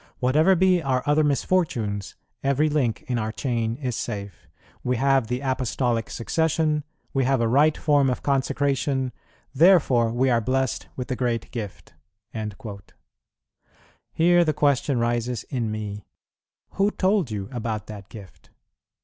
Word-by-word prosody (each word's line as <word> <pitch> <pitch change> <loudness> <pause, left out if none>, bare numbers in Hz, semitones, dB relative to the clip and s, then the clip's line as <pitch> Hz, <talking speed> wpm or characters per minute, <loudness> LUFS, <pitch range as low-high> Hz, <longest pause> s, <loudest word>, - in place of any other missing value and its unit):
Whatever 155 +9 +4
be 185 0 +3
our 130 -3 0
other 150 +1 +3
misfortunes, 135 - 0 0.3
every 140 +3 +2
link 135 -7 0
in 125 -2 -2
our 110 0 -2
chain 115 -2 -2
is 125 -3 -3
safe; 100 -7 -6 0.4
we 125 - 0
have 135 -1 +2
the 125 +2 -2
Apostolic 125 -3 -1
Succession, 155 +3 0 0.3
we 135 - +2
have 135 0 +2
a 115 - +2
right 145 +6 +4
form 145 -3 +3
of 125 - -3
consecration: 135 -1 0 0.4
therefore 140 -8 +4
we 130 +2 +2
are 115 -1 +3
blessed 130 +1 -1
with 125 - -5
the 130 - -2
great 120 -3 -2
Gift." 110 -5 -7 2.2
Here 175 +1 +4
the 155 -2 +1
question 140 -2 +2
rises 120 0 -1
in 120 -4 -1
me, 105 -1 -5 0.6
"Who 200 +1 +2
told 195 - +1
you 100 -3 -4
about 110 -3 -3
that 105 -2 -10
Gift?" 100 -5 -13
130 Hz, 140 wpm, -24 LUFS, 115-145 Hz, 2.2 s, Whatever